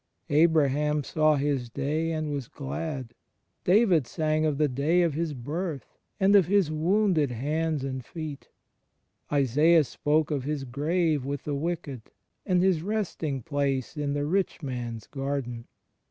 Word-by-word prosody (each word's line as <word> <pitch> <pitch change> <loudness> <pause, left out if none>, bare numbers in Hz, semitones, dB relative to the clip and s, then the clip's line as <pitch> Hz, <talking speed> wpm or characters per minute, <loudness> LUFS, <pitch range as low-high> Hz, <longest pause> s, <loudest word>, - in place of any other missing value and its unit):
Abraham 150 -1 +3
saw 155 +2 +2
His 140 -4 -1
day, 150 +6 -1
and 155 -2 -2
was 140 -4 -3
glad; 135 -3 -5 0.5
David 180 - +4
sang 155 +1 0
of 150 -2 -1
the 150 0 +3
day 145 +7 +2
of 165 -3 +1
His 160 -1 -2
birth 150 +4 -5 0.2
and 195 +1 +5
of 190 -5 +6
His 195 -5 +3
woimded 170 -1 +2
hands 150 +4 -1
and 130 -1 -4
feet: 155 0 -7 0.8
Isalas 150 +4 +4
spoke 150 +1 0
of 140 -3 -1
His 145 0 -2
grave 150 +3 0
with 140 +1 -4
the 150 - -3
wicked 150 -4 -3 0.5
and 180 -2 +3
his 185 -4 +3
resting 170 - -2
place 140 -2 -1
in 145 -2 -2
the 145 0 -1
rich 180 +1 -1
man's 120 -4 -5
garden. 135 -4 -4
150 Hz, 145 wpm, -27 LUFS, 140-165 Hz, 0.8 s, of